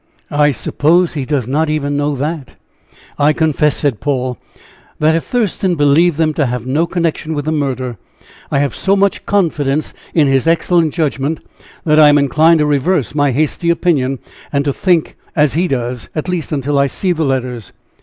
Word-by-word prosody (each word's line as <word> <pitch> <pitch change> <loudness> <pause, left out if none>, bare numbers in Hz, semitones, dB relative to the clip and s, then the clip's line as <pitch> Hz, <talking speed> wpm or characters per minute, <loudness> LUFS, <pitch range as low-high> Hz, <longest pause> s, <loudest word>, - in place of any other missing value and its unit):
"I 150 0 +3
suppose 165 +6 +1
he 145 -5 -3
does 135 -5 -1
not 150 +4 0
even 145 -2 -1
know 145 0 0
that." 145 0 -4 0.6
"I 145 +1 +4
confess," 150 -1 +1
said 140 -7 -1
Paul, 130 -4 -2 0.6
"that 155 +1 +2
if 165 - 0
Thurston 200 -6 0
believed 150 +2 +3
them 160 -1 +1
to 145 -3 0
have 125 -1 -4
no 150 +6 0
connection 165 -2 -2
with 145 -1 -3
the 155 - -1
murder, 130 -5 -2 0.5
I - - 0
have 140 0 0
so 195 0 +1
much 200 -1 +1
confidence 155 -7 0 0.2
in 155 -3 +4
his 135 +2 +1
excellent 165 -1 +2
judgment, 150 -1 -1 0.4
that 155 -1 +3
I 150 -1 +8
am 145 - +5
inclined 155 +4 +4
to - - +2
reverse 145 - 0
my 145 -1 +2
hasty 155 +5 -1
opinion, 145 -6 +1 0.3
and 140 -1 0
to 140 - 0
think 175 -1 0 0.2
as 150 -2 +2
he 175 +4 +1
does, 125 -4 -3
at 155 +2 -3
least 180 -3 -3
until 140 -1 0
I 140 - +3
see 185 +6 -2
the 165 -2 0
letters. 125 -5 -3
150 Hz, 185 wpm, -15 LUFS, 140-165 Hz, 0.6 s, I